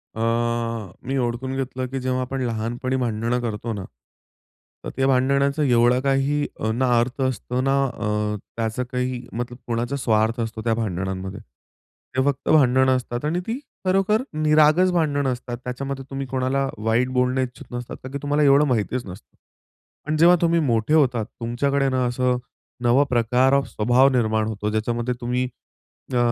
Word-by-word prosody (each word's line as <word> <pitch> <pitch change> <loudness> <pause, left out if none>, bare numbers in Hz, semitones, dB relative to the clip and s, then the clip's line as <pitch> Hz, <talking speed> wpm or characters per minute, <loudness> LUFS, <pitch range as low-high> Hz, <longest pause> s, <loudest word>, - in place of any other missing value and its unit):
अ, 110 - -4 0.9
मी 135 0 -1
ओडखून 125 +2 -2
घेतलं 130 -1 -3
की 135 +1 -4
जेव्हा 130 0 -1
आपण 130 +1 -3
लहानपणी 120 +2 -2
भांडणं 120 0 -1
करतो 115 0 -3
ना, 100 -2 -5 1.0
तर - - -4
त्या 135 +1 +1
भांडणाचा 140 +3 +2
एवढा 125 -1 +4
काह 135 0 +2 0.5
अ, 110 - +1
ना 125 +3 +1
अर्थ 130 +3 -2
असतो 125 0 -1
ना, 135 +1 +2
अ, 105 -3 -2 0.2
त्याचं 115 +2 -1
काही 125 -1 -2
मतलब 120 +1 -4
कोणाचा 120 +3 -1
स्वार्थ 115 -2 +1
असतो 115 -1 -4
त्या 115 -1 +1
भांडणांमध्ये. 95 -2 -3 0.8
ते 130 - +3
फक्त 140 -1 -1
भांडणं 130 -3 +5
असतात 125 +1 -3
आणि 165 +4 0
ती 240 +4 -2 0.3
खरोखर 195 +4 +2
निरागस 155 +4 +4
भांडणं 145 -6 +1
असतात. 120 -1 -5
त्याच्यामध्ये 135 +1 -5
तुम्ही 135 0 -4
कोणाला 130 +1 0 0.2
वाईट 115 +3 +2
बोलणं 125 +1 +2
इच्छूक 125 -1 -6
नसतात 120 0 -5
कारण 130 - -7
की 140 - -1
तुम्हाला 145 +1 +1
एवढं 140 +1 +5
माहितीच 120 0 -1
नसतं. 95 +2 -12 0.7
पण 155 +1 -1
जेव्हा 175 +3 +7
तुम्ही 170 0 +3
मोठे 120 -1 +1
होतात 125 -8 +3
तुमच्याकडे 135 +5 -1
ना 130 -1 +1
असं 125 0 +1 0.5
नवा 120 +4 +5
प्रकार 125 +2 +3
ऑफ 140 0 +2
स्वभाव 125 +5 +3
निर्माण 110 -4 +1
होतो. 105 -1 -3
ज्याच्यामध्ये 120 +3 -1
तुम्ही 125 +1 0 0.7
अ, 125 - +2
125 Hz, 160 wpm, -23 LUFS, 115-135 Hz, 1.0 s, जेव्हा